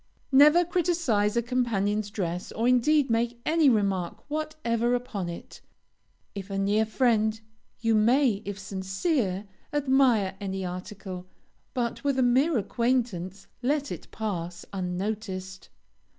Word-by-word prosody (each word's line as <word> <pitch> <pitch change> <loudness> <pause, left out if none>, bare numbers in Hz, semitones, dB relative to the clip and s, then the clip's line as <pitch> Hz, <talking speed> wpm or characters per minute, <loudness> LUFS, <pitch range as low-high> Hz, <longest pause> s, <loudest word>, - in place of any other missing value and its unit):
Never 300 +6 +7
criticise 325 - +1
a 235 - +2
companion's 215 -4 0
dress, 180 -4 -3
or 230 +2 0
indeed 260 +2 +3
make 235 +1 0
any 315 -2 +4
remark 195 -6 0
whatever 270 -7 0
upon 210 -8 -4
it. 170 - -9 0.7
If 200 -1 -7
a 195 - -3
near 205 +3 +2
friend, 220 -2 +2 0.4
you 225 -1 +2
may, 225 0 +3
if 200 0 -5
sincere, 190 - -1 0.3
admire 265 -9 +2
any 190 -1 -3
article, 185 0 -7 0.5
but 240 0 -2
with 280 -2 +1
a 260 - +3
mere 260 +5 +3
acquaintance 205 -4 -1 0.2
let 285 +3 0
it - - -7
pass 175 -5 -4
unnoticed. 190 0 -4
220 Hz, 120 wpm, -27 LUFS, 195-255 Hz, 0.7 s, Never